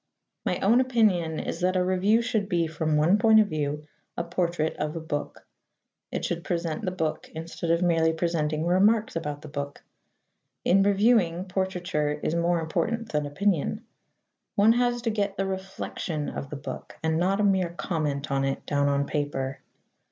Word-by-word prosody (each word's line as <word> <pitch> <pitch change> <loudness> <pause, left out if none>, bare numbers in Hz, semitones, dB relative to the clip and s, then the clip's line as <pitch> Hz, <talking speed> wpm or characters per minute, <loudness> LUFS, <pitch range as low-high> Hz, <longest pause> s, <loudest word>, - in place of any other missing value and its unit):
My - - +1
own 230 +6 +5
opinion 210 -11 +2
is 165 - -4
that 185 +1 +1
a 180 - +3
review 195 +5 +3
should 215 -4 -1
be, 170 -3 +2
from 155 -1 0
one 170 +7 +4
point 220 -1 +6
of 210 -1 +3
view, 150 -1 -2 0.3
a - - 0
portrait 170 -2 -1
of 150 +2 -2
a - - -2
book. 155 -2 -5 0.7
It - - -2
should 170 -1 -2
present 170 +1 -2
the 185 - 0
book 165 -4 -3
instead 165 +1 -5
of 170 +2 +3
merely 165 -2 +3
presenting 160 -2 -1
remarks 205 +5 +3
about 150 -2 -4
the - - -8
book. 140 -1 -6 0.8
In 195 +2 +5
reviewing, 195 -3 +3
portraiture 180 -5 -1
is 150 +1 -2
more 170 0 +2
important 200 +8 -1
than 150 -1 0
opinion. 200 - 0 0.7
One 210 +3 +6
has 240 0 +1
to 230 - +1
get 200 -2 -1
the 195 - 0
reflexion 190 -5 -4
of 140 - -6
the 150 - -5
book, 140 - -8
and 160 0 +1
not 190 +3 +1
a - - +2
mere 190 -3 +2
comment 155 -5 -2
on 135 0 +1
it, 135 0 -2
down 145 -1 +1
on 140 0 +1
paper. 140 -3 -2
170 Hz, 175 wpm, -26 LUFS, 155-195 Hz, 0.8 s, point